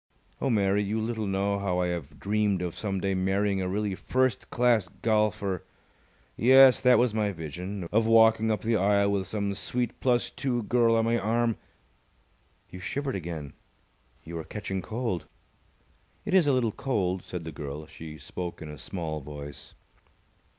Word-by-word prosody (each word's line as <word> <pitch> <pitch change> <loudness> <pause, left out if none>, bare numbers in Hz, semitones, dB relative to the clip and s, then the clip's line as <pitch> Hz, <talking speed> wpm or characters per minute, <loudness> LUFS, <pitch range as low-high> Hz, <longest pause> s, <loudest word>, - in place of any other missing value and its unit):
Oh, 135 - +1
Mary, 100 -3 +2
you 105 +2 -1
little 110 -1 -2
know 100 +1 0
how 95 -3 -1
I 90 -1 +1
have 85 -5 -5
dreamed 100 -2 +1
of 90 -2 -3
some 100 -3 -3
day 95 +1 0
marrying 95 +1 +1
a 95 - -1
really 105 +1 -1
first 130 +3 0
class 120 -5 +2 0.2
golfer! 105 -4 +1 0.7
Yes, 130 +2 +7
that 125 -1 +6
was 120 -2 +2
my 105 -2 +1
vision 90 +3 -6
of 110 +1 +3
walking 110 0 +5
up 105 -3 0
the 115 0 +1
aisle 100 +1 +3
with 100 -1 -1
some 100 -2 -2
sweet 120 +4 -2
plus 125 -2 +1
two 125 -4 -2
girl 115 +1 +3
on 115 0 +2
my 115 +1 +2
arm. 115 +1 +1 1.2
You 90 - -8
shivered 140 +7 -3
again. 80 -6 -5 0.7
You 85 +1 -6
are - - -5
catching 95 0 -4
cold." 110 -6 -3 1.0
"It - - -2
is 185 -5 +5
a - - +5
little 120 -4 +2
cold," 95 -8 -1
said 90 -1 -6
the 80 - -6
girl. 75 +1 -6
She 80 0 -10
spoke 90 +2 -6
in 75 - -7
a 75 - -10
small 80 -1 -4
voice. 75 0 -9
100 Hz, 170 wpm, -28 LUFS, 90-115 Hz, 1.2 s, Yes